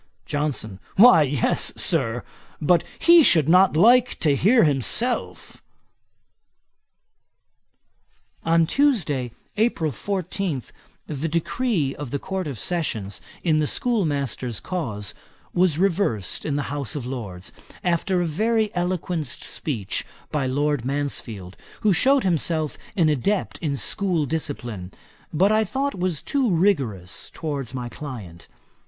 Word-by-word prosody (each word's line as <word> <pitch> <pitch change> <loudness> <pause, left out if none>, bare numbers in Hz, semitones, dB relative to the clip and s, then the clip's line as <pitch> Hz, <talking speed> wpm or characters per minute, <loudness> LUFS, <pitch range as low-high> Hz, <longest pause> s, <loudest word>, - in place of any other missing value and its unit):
JOHNSON. 145 -10 -3 0.2
'Why 230 -4 +8
yes, 140 -3 +1
Sir; 125 -9 +2 0.4
but 165 +2 +3
he 340 0 +7
should 160 - +4
not 180 0 +5
like 245 +6 +5
to 145 -3 +3
hear 225 - +4
himself.' 135 - 0 2.8
On 165 0 +3
Tuesday, 170 - +1 0.3
April 210 -8 +1
14, 185 - -3 0.4
the 150 +1 -3
decree 170 - 0
of 145 -3 -6
the 140 - -2
Court 190 +3 -4
of 135 -5 -5
Session 135 - -1 0.4
in 160 -3 +2
the 155 -1 +1
schoolmaster's 145 - 0
cause 110 - -4 0.4
was 175 -4 +2
reversed 170 - 0
in 145 - -1
the 145 - -1
House 145 0 -4
of 140 -5 -4
Lords, 105 -8 -6 0.3
after 180 +1 +1
a - - -1
very 215 +6 0
eloquent 175 -3 -2
speech 115 -6 -3 0.3
by 140 -3 0
Lord 145 0 0
Mansfield, 120 -9 -4 0.3
who 210 -2 +4
shewed 270 +9 +3
himself 160 -3 0 0.2
an 165 -4 +4
adept 155 - 0
in 145 -4 -2
school 180 -2 +1
discipline, 120 - -4 0.4
but 190 +7 +3
I 215 0 +3
thought 270 +7 -2
was 180 -5 -2
too 270 -4 0
rigorous 140 - 0
towards 140 -5 -4
my 125 -1 -4
client. 115 - -9
155 Hz, 125 wpm, -23 LUFS, 130-185 Hz, 2.8 s, Why